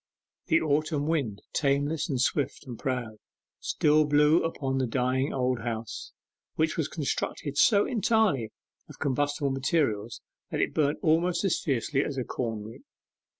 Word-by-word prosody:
The 160 -2 +4
autumn 155 -1 0
wind, 140 -11 -1
tameless, 145 +2 +1
and 135 -4 -1
swift, 135 +2 0
and 120 -4 -8
proud, 125 -5 -3 0.4
still 155 0 +3
blew 150 +2 +4
upon 135 -5 -2
the 130 - 0
dying 130 +3 0
old 125 -2 0
house, 115 -1 -5 0.4
which 160 0 +1
was 160 - 0
constructed 145 -1 -3
so 200 +7 +5
entirely 220 - +1 0.4
of - - -12
combustible 145 +1 0
materials 130 -6 0 0.3
that - - -3
it - - 0
burnt 145 -1 +1
almost 170 +3 +2
as 195 - +1
fiercely 135 +1 0
as 140 - -4
a 130 - 0
corn 115 -4 -3
rick. 110 +2 -10
140 Hz, 150 wpm, -28 LUFS, 125-155 Hz, 0.4 s, so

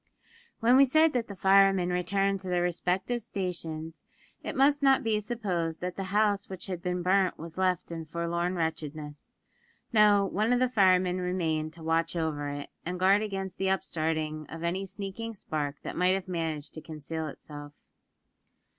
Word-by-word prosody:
When 240 +3 +6
we 275 - +8
said 315 +4 +4
that 245 -2 -1
the 200 - -8
firemen 195 -1 +4
returned 195 +2 +1
to 190 - -9
their 175 -1 +1
respective 180 +7 -1
stations, 165 -6 -5 0.4
it - - -5
must 285 +2 +4
not 270 -1 +4
be 220 -2 +1
supposed 195 -8 -2
that 180 0 -3
the 195 - -4
house 205 0 +1
which 190 -2 -7
had 180 -3 -5
been 180 -1 -2
burnt 190 +1 +2
was 165 +1 -9
left 185 -2 0
in 165 -1 -5
forlorn 170 +3 -2
wretchedness. 155 -3 -4 0.6
No; 210 -2 +6
one 215 +4 0
of 245 - +2
the 255 - +3
firemen 185 -4 +3
remained 160 -4 -1
to 165 -1 -12
watch 165 +1 0
over 155 -3 -2
it, 145 0 -6
and 180 +1 -4
guard 195 +3 +5
against 195 -3 -4
the 190 0 +1
upstarting 155 -4 -1
of 165 +1 -7
any 185 +3 -1
sneaking 205 +4 -5
spark 150 -6 -3
that - - -5
might 180 +1 +3
have 195 -1 -4
managed 165 -4 -3
to 155 - -7
conceal 160 0 -5
itself. 145 0 -10
180 Hz, 170 wpm, -29 LUFS, 160-195 Hz, 0.6 s, we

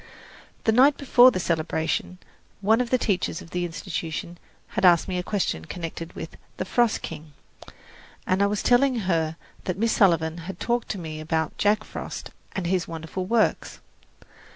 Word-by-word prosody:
The 220 - +3
night 265 +5 +5
before 255 -2 +7
the 185 - -2
celebration, 165 +1 -1 0.4
one 220 +4 +4
of 245 - -2
the 255 - +3
teachers 190 -7 -1
of 165 - -12
the 180 0 -1
Institution 170 -1 -5 0.3
had - - -3
asked 175 -3 +6
me 180 -2 -2
a - - 0
question 180 - -2
connected 165 -1 -6
with - - -8 0.2
"The - - -2
Frost 240 -3 +1
King," 150 -1 -8 0.9
and 185 +2 +1
I 200 - +4
was 205 0 -2
telling 250 -1 +3
her 165 -4 0 0.3
that 185 -1 -2
Miss 225 +2 +1
Sullivan 165 -4 +3
had 195 - -7
talked 240 0 -1
to 200 - -2
me 160 -3 -6
about 160 0 -1
Jack 210 +1 +3
Frost - - -7 0.2
and 190 - -3
his 180 0 0
wonderful 165 +3 -5
works. 225 +1 +1
185 Hz, 170 wpm, -25 LUFS, 165-220 Hz, 0.9 s, before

